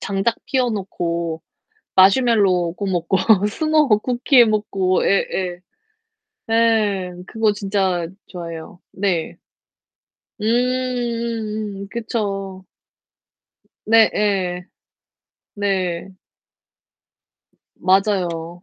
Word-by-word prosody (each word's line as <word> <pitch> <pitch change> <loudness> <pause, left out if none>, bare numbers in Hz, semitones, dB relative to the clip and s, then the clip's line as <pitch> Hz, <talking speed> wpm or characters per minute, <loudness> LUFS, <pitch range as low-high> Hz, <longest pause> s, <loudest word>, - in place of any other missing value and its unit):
장작 200 +4 -1
피워 255 -3 0
놓고 170 -5 -3 0.5
마시멜로 190 -4 +4
구워 200 -1 -3
먹고 175 +2 0 0.3
스모어 310 +4 +1
쿠키 250 +3 +1
해 - - +9
먹고 200 -4 0
예. 195 - +2
예. 180 -2 -3 0.9
네, 215 -5 +2 0.2
그거 220 -1 +1
진짜 195 -4 -1 0.2
좋아해요. 170 +1 -8
네. 185 -4 -1 1.0
음 210 - -4
음음음 235 -4 -2
그쵸. 195 -5 -4 1.2
네예. 200 -5 +2 0.9
네. 190 -3 -2 1.7
맞아요. 180 -3 0
200 Hz, 150 characters per minute, -20 LUFS, 180-225 Hz, 1.7 s, 해